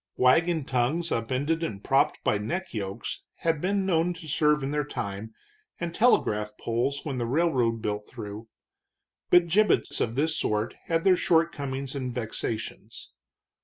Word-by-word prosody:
Wagon 160 +4 +3
tongues 135 +8 0
upended 130 +8 0
and 105 -12 -4
propped 135 +1 +2
by 105 - +2
neckyokes 110 - -4 0.2
had 165 -3 +1
been 195 +1 +1
known 175 -1 +2
to 165 -2 -10
serve 150 0 +2
in 135 - -2
their 150 0 0
time, 100 -5 -5 0.5
and 170 -1 -3
telegraph 105 - +2
poles 125 +5 -1
when 135 -4 -3
the 120 - -1
railroad 125 -6 +1
built 105 0 -2
through. 110 -1 -8 0.8
But 175 -1 +6
gibbets 205 +5 +2
of 115 0 -1
this 155 +3 +1
sort 105 +2 0
had 165 0 0
their 190 -1 +6
shortcomings 140 -6 0
and 130 -3 -3
vexations. 115 -2 -5
135 Hz, 145 wpm, -27 LUFS, 115-165 Hz, 0.8 s, But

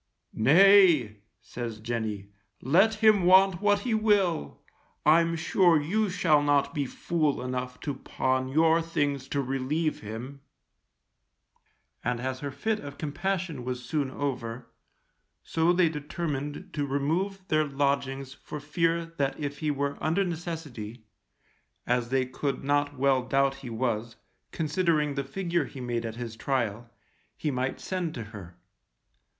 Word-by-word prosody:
Nay, 160 - +6 0.3
says 115 -3 -6
Jenny, 110 -3 -3 0.3
let 195 - +4
him 215 -2 +5
want 185 0 +5
what 205 -1 +3
he 240 0 -1
will, 205 - +1 0.5
I'm 165 +2 +4
sure 165 0 +3
you 205 +8 0
shall 165 -5 +3
not 145 +1 +2
be 145 -4 -1
fool 155 0 -1
enough 125 0 -4
to 145 - -2
pawn 130 0 -1
your 160 +4 +3
things 145 -5 -1
to 140 0 -1
relieve 135 +5 -1
him; 120 +6 -7 1.6
and 120 0 -1
as 130 +1 -3
her 145 - -4
fit 210 +11 -2
of 145 -1 -9
compassion 170 -2 -3
was 125 0 -4
soon 145 0 -1
over, 125 -4 -4 0.8
so 165 +1 +2
they 180 -1 +4
determined 150 +2 -4
to 145 -2 -1
remove 175 +8 -1
their 155 0 +3
lodgings 140 -1 -1
for 150 +1 -8
fear 165 +3 0
that 150 -5 -3
if 145 -1 -4
he 155 - -1
were 140 0 -2
under 165 +5 +2
necessity, 155 - -6 0.8
as 120 -1 0
they 130 0 +1
could 135 +2 -3
not 145 0 0
well 135 -1 +3
doubt 135 +1 +1
he 125 - -8
was, 115 -1 -2 0.4
considering 155 -2 +1
the 140 0 -2
figure 170 +2 -1
he 135 - -10
made 120 -2 -2
at 110 - -6
his 115 -2 -6
trial, 120 -3 -2 0.5
he 150 - -1
might 130 0 -2
send 180 -4 -3
to 120 - -4
her. 100 -5 -11
145 Hz, 140 wpm, -28 LUFS, 130-165 Hz, 1.6 s, Nay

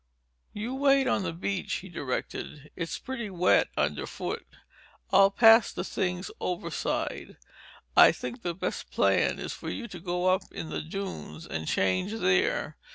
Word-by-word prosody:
"You 220 +5 -4
wait 275 0 +4
on - - +1
the 185 -3 -2
beach," 185 +3 -3
he 190 - -4
directed. 145 -1 -5
"It's 165 -1 -3
pretty 235 -5 -5
wet 180 -1 +3
underfoot. - - -2 0.6
I'll 195 0 +7
pass 225 +2 +6
the - - -4
things 180 0 -2
overside. 180 -1 -3 0.6
I - - +9
think 240 - -6
the 175 -4 -3
best 190 - -4
plan - - +2
is - - -5
for - - -7
you 240 - -4
to 180 - -8
go 180 +1 -2
up 190 0 -3
in 160 - -6
the - - -2
dunes 160 - -6
and 80 -1 -5
change 95 - +1
there. 95 - +1
185 Hz, 155 wpm, -28 LUFS, 165-215 Hz, 0.6 s, I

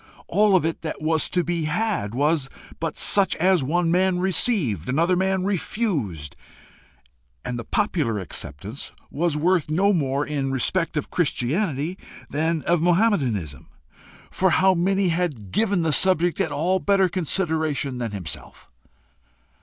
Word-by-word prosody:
all 210 -2 +3
of 175 - +3
it 165 - -2
that 160 - -5
was 160 +1 +1
to 180 - +1
be 170 -1 -2
had, 165 - -1
was 145 0 +1 0.3
but 165 -2 -3
such 200 -1 +4
as 185 0 +3
one 165 +5 0
man 185 +1 +2
received, 180 - +1
another 165 +7 +2
man 190 0 0
refused; 160 - -2 1.1
and 120 -1 -3
the - - -5
popular 155 - 0
acceptance 95 - -6 0.2
was 160 0 0
worth 170 0 +1
no 195 +6 +3
more 140 -4 0
in 140 -3 -2
respect 165 +6 0
of 150 - -3
Christianity 160 - -1 0.3
than 160 +1 0
of 170 -1 +1
Mahometanism, 140 - +1 0.6
for 190 - +2
how 190 +2 +4
many 190 +2 +1
had 160 - -2
given 200 - +1
the 160 -2 +1
subject 175 -1 +2
at 160 - -1
all 170 +6 +1
better 195 -1 +3
consideration 160 -6 -1
than 120 -2 -2
himself? 90 - -8
165 Hz, 140 wpm, -23 LUFS, 140-185 Hz, 1.1 s, such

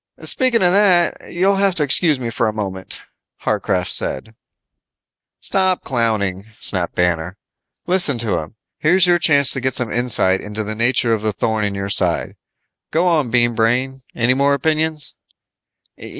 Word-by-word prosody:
"Speaking 245 -5 +2
of 175 - +4
that, 180 -4 +1
you'll 195 +3 +1
have 195 -2 +1
to 160 - +1
excuse 150 0 +3
me 120 -2 -4
for 115 -1 -1
a - - 0
moment," 95 -3 -6 0.4
Warcraft 90 0 -1
said. 110 +12 -1 1.1
"Stop 185 -1 0
clowning," 105 -6 -1
snapped 90 -3 -3
Banner. 90 0 -1 0.5
"Listen 175 -7 +2
to 110 -6 -1
him. 80 +7 -10 0.2
Here's 180 +4 +4
your 175 -1 +3
chance 140 -5 +3
to 135 - -1
get 130 0 -2
some 125 -3 +2
insight 115 -6 +2
into 105 +1 -5
the 105 +1 -5
nature 115 +1 +1
of 110 - -2
the 110 0 -1
thorn 110 +2 -2
in 100 -1 -2
your 100 0 -4
side. - - +1 0.5
Go 165 +3 0
on, 155 -8 +1
Bean 120 0 +2
Brain. 125 +4 -1
Any 120 +2 +2
more 140 +2 +2
opinions?" 155 0 -1
125 Hz, 160 wpm, -18 LUFS, 105-160 Hz, 1.1 s, of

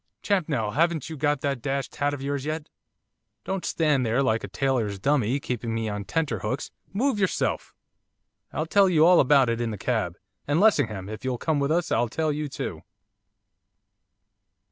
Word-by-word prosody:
'Champnell, 150 - 0
haven't 160 -1 +1
you - - -4
got 145 -1 0
that 140 -4 -1
dashed 135 0 -3
hat 145 0 +1
of 140 -2 -5
yours 140 -1 -2
yet? 155 +1 -4 0.7
Don't 190 -1 -3
stand 150 -5 +1
there 120 +4 +1
like 115 -3 +1
a - - -4
tailor's 120 -7 -1
dummy, 135 +2 +1
keeping 120 -4 -3
me 115 -1 -1
on 105 -1 -4
tenter 150 -9 -1
hooks, 105 +7 -3 0.2
move 240 +2 0
yourself! 195 -2 -1 0.8
I'll 155 - -2
tell 195 +3 +4
you 160 -3 +5
all 180 +1 +7
about 135 -1 +5
it 115 0 -1
in 120 - -1
the 105 - -4
cab. 105 -6 -1 0.3
And, 145 +3 +2
Lessingham, 125 - +2
if 110 +2 -7
you'll 130 -1 -1
come 155 +3 0
with 140 0 0
us 170 +1 0
I'll 120 0 +2
tell 155 +5 0
you 150 0 -3
too. 80 -10 -5
140 Hz, 180 wpm, -26 LUFS, 115-160 Hz, 0.8 s, all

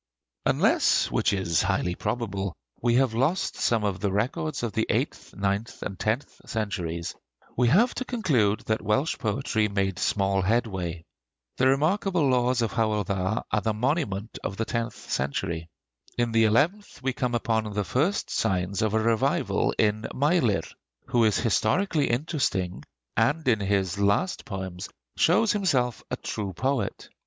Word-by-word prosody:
Unless, - - +3
which - - +2
is 95 -5 +1
highly 90 - 0
probable, 100 -3 -3 0.3
we 120 0 +2
have 130 -2 +3
lost 135 +11 0
some 115 -2 +1
of 100 -3 -1
the 100 0 0
records 125 +7 -1
of 115 - -1
the 110 - 0
eighth, - - -2
ninth, 100 +3 -2
and 95 -2 -5
tenth 115 +6 -2
centuries, 90 -7 -3 0.4
we 125 0 +3
have 215 - +4
to 255 - -4
conclude 135 - +1
that 110 0 -1
Welsh 135 +9 0
poetry 110 0 0
made 95 -2 -1
small 95 -1 +1
headway. 95 -6 -1 0.5
The 130 - +4
remarkable 160 +4 +2
laws 125 -1 +2
of 115 - -1
Howel 110 -3 +1
Dda 95 +3 -1
are 110 - +2
the 110 +2 -1
monument 115 - -1
of 95 - -4
the 115 - -1
tenth 115 0 -2 0.2
century. 80 +5 -2 0.5
In 120 -1 +1
the 115 0 +4
eleventh 155 - +1
we 135 -1 0
come 125 -1 -1
upon 110 -2 0
the 105 0 -1
first 150 - 0
signs 95 +1 0
of 110 0 +1
a - - +4
revival 115 0 +1
in 110 0 +1
Meilir, 135 - +2 0.5
who 120 -2 +3
is 110 - +3
historically 145 - +1
interesting, 120 - -1 0.3
and 140 +8 +1
in 115 -4 +4
his 100 -2 0
last 100 - +1
poems 95 -3 -5 0.3
shows 225 - +4
himself 135 - +1
a - - -2
true 100 -3 -4
poet. 130 0 -2
110 Hz, 155 wpm, -26 LUFS, 100-130 Hz, 0.5 s, have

